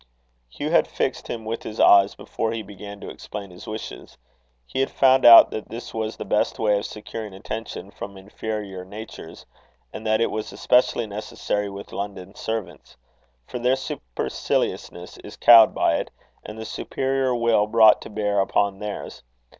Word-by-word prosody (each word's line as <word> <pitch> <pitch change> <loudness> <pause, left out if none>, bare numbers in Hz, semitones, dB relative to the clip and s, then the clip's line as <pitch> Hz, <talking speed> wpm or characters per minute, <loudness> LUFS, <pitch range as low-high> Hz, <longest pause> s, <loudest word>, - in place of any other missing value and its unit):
Hugh - - -4
had - - +4
fixed - - -2
him 115 -2 -5
with 115 +1 -3
his 110 - -8
eyes, 100 0 +6
before 115 0 -3
he 115 -1 -4
began 100 0 -10
to - - -7
explain 100 -2 -8
his 90 - -12
wishes. 110 +1 -8 0.5
He 65 - -5
had 135 - +1
found 130 -1 +4
out 115 -1 +10
that 110 - -6
this 115 +2 -8
was 110 0 -3
the - - -6
best 105 - 0
way 105 -2 +2
of - - -5
securing 105 -1 -8
attention 100 -1 -7
from 100 -1 -8
inferior 100 -1 -6
natures, 100 -4 -10 0.5
and - - -7
that 110 0 +2
it 115 - +1
was 110 0 -4
especially 125 -1 +2
necessary 105 -1 -3
with 100 0 -9
London 100 -1 -6
servants; 110 -1 -6 0.5
for 125 - -6
their 125 +2 +2
superciliousness 90 - -3
is - - -11
cowed 115 -2 +8
by - - +2
it, - - -4 0.3
and 105 - -9
the 110 - -6
superior 135 0 -1
will 115 -3 +2
brought 110 -1 +6
to - - -9
bear 105 -1 0
upon 100 0 +1
theirs. 105 -1 -6
105 Hz, 170 wpm, -23 LUFS, 100-115 Hz, 0.5 s, out